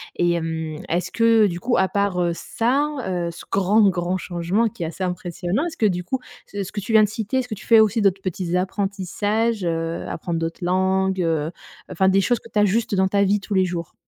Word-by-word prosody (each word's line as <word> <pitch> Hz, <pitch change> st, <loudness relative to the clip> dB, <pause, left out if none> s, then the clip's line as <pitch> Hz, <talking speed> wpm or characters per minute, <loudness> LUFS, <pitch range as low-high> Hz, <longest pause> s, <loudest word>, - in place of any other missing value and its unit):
Et 175 Hz, 0 st, +2 dB
hem, 160 Hz, -2 st, -3 dB
est-ce 175 Hz, +2 st, -1 dB
que 230 Hz, -2 st, +4 dB
du 175 Hz, -2 st, -4 dB
coup 240 Hz, +6 st, 0 dB
à 190 Hz, 0 st, +2 dB
part, 200 Hz, -3 st, 0 dB
heu, 175 Hz, -1 st, +1 dB
ça, 250 Hz, -, 0 dB, 0.2 s
heu, 175 Hz, -2 st, -2 dB
ce 170 Hz, -, -11 dB
grand, 195 Hz, +3 st, +3 dB
grand 180 Hz, 0 st, -1 dB
changement 180 Hz, +6 st, 0 dB
qui 210 Hz, -5 st, -7 dB
est -, -, -1 dB
assez 170 Hz, +4 st, -5 dB
impressionnant, 180 Hz, -, -2 dB
est-ce 320 Hz, -, -7 dB
que 225 Hz, -, +1 dB
du 180 Hz, -3 st, 0 dB
coup 260 Hz, +7 st, -2 dB, 0.3 s
ce 200 Hz, -1 st, -4 dB
ce 190 Hz, -, -8 dB
que 210 Hz, -, -4 dB
tu 210 Hz, +3 st, -4 dB
viens 220 Hz, -1 st, +7 dB
de 210 Hz, -, +1 dB
citer, 220 Hz, +3 st, -2 dB
est-ce 245 Hz, -3 st, -4 dB
tu 195 Hz, -, -10 dB
fais 225 Hz, -1 st, +7 dB
aussi 220 Hz, +1 st, +2 dB
d'autres 195 Hz, -1 st, +2 dB
petits 180 Hz, -1 st, -3 dB
apprentissages, 200 Hz, +3 st, -1 dB
heu, 165 Hz, 0 st, -2 dB
apprendre 170 Hz, -2 st, -3 dB
d'autres 165 Hz, +2 st, -4 dB
langues, 190 Hz, +1 st, +1 dB
heu, 160 Hz, -2 st, 0 dB, 0.4 s
enfin 190 Hz, +3 st, +2 dB
des 195 Hz, +1 st, +4 dB
choses 240 Hz, +4 st, +1 dB
que -, -, -15 dB
tu 210 Hz, -, 0 dB
ajustes 210 Hz, +1 st, +2 dB
dans 190 Hz, 0 st, +3 dB
ta 200 Hz, +1 st, +2 dB
vie 205 Hz, +2 st, +2 dB
tous 205 Hz, -, -6 dB
les 190 Hz, -1 st, +4 dB
jours? 170 Hz, -2 st, -4 dB
190 Hz, 230 wpm, -22 LUFS, 175-215 Hz, 0.4 s, viens